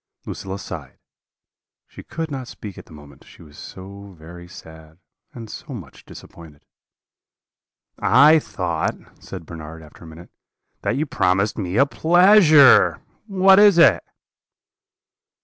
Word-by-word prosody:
"Lucilla 95 0 -7
sighed; 100 - -10 0.9
she - - -14
could 160 -1 -7
not 130 -3 -7
speak 105 -5 -11
at - - -14
the - - -20
moment, 75 -2 -16
she - - -18
was 75 -2 -18
so 100 +1 -13
very 85 +2 -14
sad, 80 -2 -15 0.3
and 115 -2 -11
so 135 +5 -10
much 85 - -13
disappointed. 80 -4 -16 1.3
"'I 150 +5 +4
thought,' 85 - -6
said 90 -4 -10
Bernard, 80 0 -11
after 75 +2 -18
a - - -13
minute, 80 +2 -15 0.5
'that - - -3
you 155 - -2
promised 100 -5 -1
me 95 0 -4
a 140 - +4
pleasure. 170 -2 +4 0.3
What 190 -1 +4
is 205 -3 +5
it?' 165 -4 +4
95 Hz, 130 wpm, -20 LUFS, -, 1.3 s, is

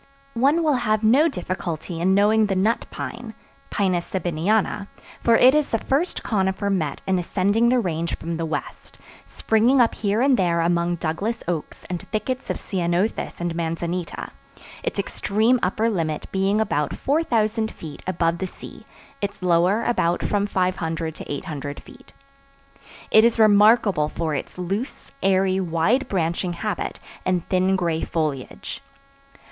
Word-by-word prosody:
One 280 +8 +3
will 300 -4 +3
have 215 -1 +1
no 265 +9 +5
difficulty 175 - -4
in 190 +2 +3
knowing 210 +2 +4
the 195 - -1
Nut 210 +5 +1
Pine 230 -1 -7 0.3
(Pinus 185 -4 0
Sabiniana), 190 +4 0 0.3
for 230 - +4
it 255 +3 +7
is 300 -1 +2
the 225 - +1
first 285 +10 -1
conifer 195 -1 0
met 155 -7 -2
in 190 -1 +1
ascending 205 +6 +2
the 255 - +3
Range 170 -5 -2
from 165 0 -4
the 165 - -2
west, 160 - -6 0.3
springing 230 +5 +2
up 235 -2 +4
here 205 0 0
and 270 -1 +4
there 170 -3 +2
among 170 +1 +1
Douglas 185 +8 -3
oaks 170 -3 -4
and 175 -1 -4
thickets 250 +5 -3
of - - -1
ceanothus 180 +2 -1
and 175 -1 -2
manzanita; 170 +1 -3 0.5
its - - -3
extreme 220 +5 +1
upper 215 +5 +1
limit 165 -8 -1
being 195 +2 +1
about 150 -9 0
4000 225 -7 +1
feet 155 -8 -10
above 170 -2 0
the 190 - -2
sea, - - -12 0.3
its 200 -2 -4
lower 180 +5 +3
about 175 -7 +1
from 205 0 0
500 165 -4 -1
to - - -9
800 145 0 -5
feet. 265 - -16 1.0
It 220 - +7
is 235 0 +3
remarkable 210 -6 +5
for 160 -1 -2
its 140 - -5
loose, 195 +8 -4
airy, 190 0 +2
wide 185 +9 +1
branching 175 -1 -1
habit 200 +3 -3 0.2
and 180 -2 0
thin 185 +1 +2
gray 170 -4 0
foliage. 150 -6 -3
190 Hz, 150 wpm, -23 LUFS, 170-220 Hz, 1.0 s, it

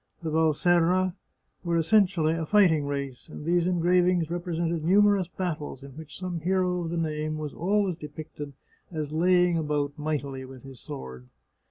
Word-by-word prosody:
The 160 - -2
Valserra 175 +3 +3 0.5
were 170 -1 0
essentially 170 -2 +3
a 165 -1 -3
fighting 165 -8 +4
race, 140 -1 -5
and 150 - -9
these 175 +1 +2
engravings 180 -1 +2
represented 170 -2 -2
numerous 200 +1 +4
battles, 155 -7 -4
in 140 - -10
which 155 +2 -10
some 180 -2 -4
hero 180 +1 0
of 165 - -4
the 170 - -3
name 155 -1 -2
was 150 -2 -5
always 195 0 0
depicted 150 -2 -8 0.4
as 155 -3 -4
laying 175 +1 +3
about 150 -1 -2
mightily 140 -3 -3
with 130 -1 -11
his 135 -3 -11
sword. 65 -1 -8
165 Hz, 155 wpm, -27 LUFS, 150-180 Hz, 0.5 s, fighting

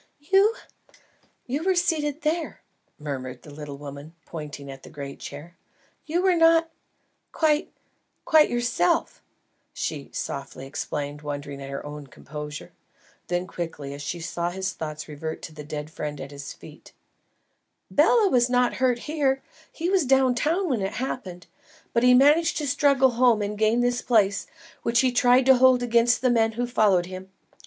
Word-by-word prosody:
"You? 410 +4 +5 0.9
You 275 +5 -2
were 380 0 +2
seated 315 -4 0
there," 320 +2 -2 0.3
murmured 130 -4 -6
the 150 - -12
little 145 -1 -8
woman, 145 +3 -10
pointing 145 -3 -7
at 135 0 -11
the - - -13
great 140 -2 -8
chair. 150 +5 -9 0.5
"You 345 +4 0
were 380 -1 +4
not 330 0 +4 0.6
quite 310 +1 +1 0.5
quite 310 -1 +5
yourself," 240 -7 0 0.5
she 145 -3 -4
softly 135 -1 -5
explained, 145 +1 -4
wondering 145 -1 -6
at 135 - -7
her 140 +1 -6
own 145 -1 -8
composure. 150 +3 -8 0.6
Then 175 0 -1
quickly, 155 -6 -6
as 140 - -8
she 170 +4 -4
saw 170 +1 -3
his 190 +1 -3
thoughts 155 -1 -6
revert 160 +1 -6
to 160 - -8
the 150 -1 -9
dead 150 +1 -6
friend 150 -2 -5
at 135 +1 -7
his 140 0 -8
feet, - - -14 1.0
"Bela 460 -4 +4
was 245 -7 +3
not 245 0 +2
hurt 250 -2 +2
here. 280 -3 0 0.3
He 345 +3 -2
was 385 -3 +3
down 265 -1 +4
town 330 +10 0
when 250 -9 0
it 195 +1 -2
happened; 190 -9 -5 0.5
but 235 - +3
he 250 0 +6
managed 295 +6 +4
to 300 - -2
struggle 270 -1 +3
home 235 -3 +3
and 205 +1 -3
gain 220 +3 +2
this 245 0 +1
place, 205 -4 +2 0.3
which 235 0 +2
he 260 -1 +2
tried 245 +1 +4
to 265 -1 +7
hold 255 -1 +5
against 235 0 +3
the 255 - +4
men 225 -1 +2
who 245 +2 -1
followed 210 -7 +3
him. 185 +1 -9
225 Hz, 165 wpm, -25 LUFS, -, 1.0 s, to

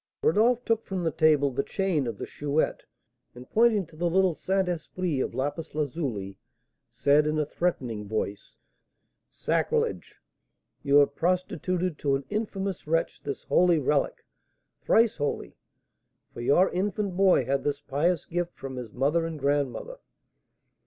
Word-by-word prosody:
Rodolph 235 +7 +3
took 225 -1 +1
from 190 -2 -3
the 165 - +1
table 150 -2 +3
the 130 - 0
chain 175 -6 -1
of 115 -3 -4
the - - -5
Chouette, 145 +1 -1 0.5
and 125 +1 -11
pointing 220 -4 +4
to 160 0 -18
the 170 +2 0
little 185 0 +3
Saint 190 +3 0
Esprit 175 -2 -2
of 125 - -2
lapis 145 +4 -3
lazuli 130 - -3 0.5
said, 150 +2 +3
in 155 0 0
a 150 - +1
threatening 125 -11 -2
voice: 105 -1 -4 0.7
"Sacrilege! - - -1 0.7
You 140 -1 +2
have 145 -1 +6
prostituted 180 -1 -1
to 140 -2 +1
an 135 0 -4
infamous 200 -5 -3
wretch 165 +1 0
this 140 - -5
holy 175 -1 +4
relic, 145 0 0 0.6
thrice 230 -1 +3
holy, 145 -2 -3 0.8
for - - -7
your 175 +10 +4
infant 195 0 -1
boy 185 -8 +4
had 135 +2 0
this 145 - -1
pious 155 +5 0
gift 175 0 -3
from 135 -1 -7
his 120 -4 -6
mother 150 +7 +1
and 160 -1 -6
grandmother!" 145 - -1
155 Hz, 145 wpm, -27 LUFS, 140-185 Hz, 0.8 s, have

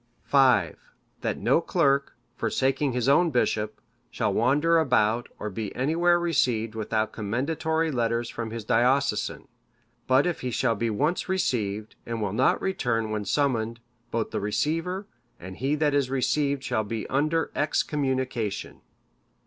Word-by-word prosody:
"V. 130 - +4 0.5
That - - -1
no - - +2
clerk, 140 0 +1 0.2
forsaking 135 +2 0
his 125 0 -1
own 165 +5 +5
bishop, 110 -5 0 0.3
shall - - -1
wander 145 +10 +3
about, 120 -5 +2
or 105 - -5
be 105 +1 -5
anywhere 170 +6 +2
received 125 -10 +1
without 110 0 -1
commendatory 155 +9 -1
letters 120 -2 0
from 115 -1 -5
his 115 -1 -6
diocesan. 130 +5 +1 0.6
But 130 +2 +4
if 175 -2 -2
he 125 - -2
shall 120 0 +1
be 115 +1 -1
once 150 - -1
received, 110 - -1
and 115 -1 -4
will 105 -3 -2
not 125 +5 +3
return 115 - -1
when 105 -1 -2
summoned, 115 -3 0 0.3
both 115 -2 -2
the - - -2
receiver, 165 - -1 0.3
and 95 +1 -9
he 135 +5 0
that 150 -1 +1
is 140 -3 +1
received 140 +1 0
shall 120 -4 0
be 110 +1 -4
under 155 +4 0
excommunication. 130 -8 -1
125 Hz, 140 wpm, -26 LUFS, 110-145 Hz, 0.6 s, own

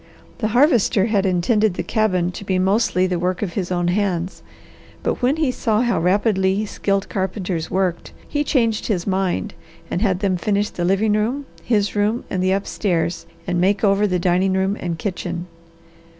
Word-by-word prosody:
The 215 - 0
Harvester 240 - +3
had 205 -3 +1
intended 195 +2 +2
the - - -2
cabin 185 -5 +1
to 185 - -8
be 190 -2 0
mostly 190 0 +2
the 180 -2 -1
work 180 +3 -1
of 180 -4 -3
his 185 -1 -3
own 175 -1 +1
hands, 185 -2 -1 0.6
but - - -1
when 255 +4 +3
he 310 -5 +1
saw 225 -3 0
how 240 -6 +1
rapidly 190 +2 +2
skilled 200 -1 -1
carpenters 185 -4 -3
worked, 185 -2 -1 0.2
he 290 0 -1
changed 230 -7 +1
his 185 -6 -1
mind 190 - -1 0.4
and 175 - -1
had 190 -4 +1
them 190 -3 +1
finish 205 +3 0
the 175 - -2
living 200 +4 +2
room, 235 +7 0 0.2
his 205 -4 +1
room, 210 +4 +1
and 185 - -1
the 185 0 +2
upstairs, 180 -3 -1 0.2
and 175 -1 0
make 195 +3 +2
over 200 0 +3
the 180 -2 0
dining 180 +2 +2
room 190 +1 +1
and 170 -2 -3
kitchen. 175 -1 -4
195 Hz, 180 wpm, -21 LUFS, 180-215 Hz, 0.6 s, Harvester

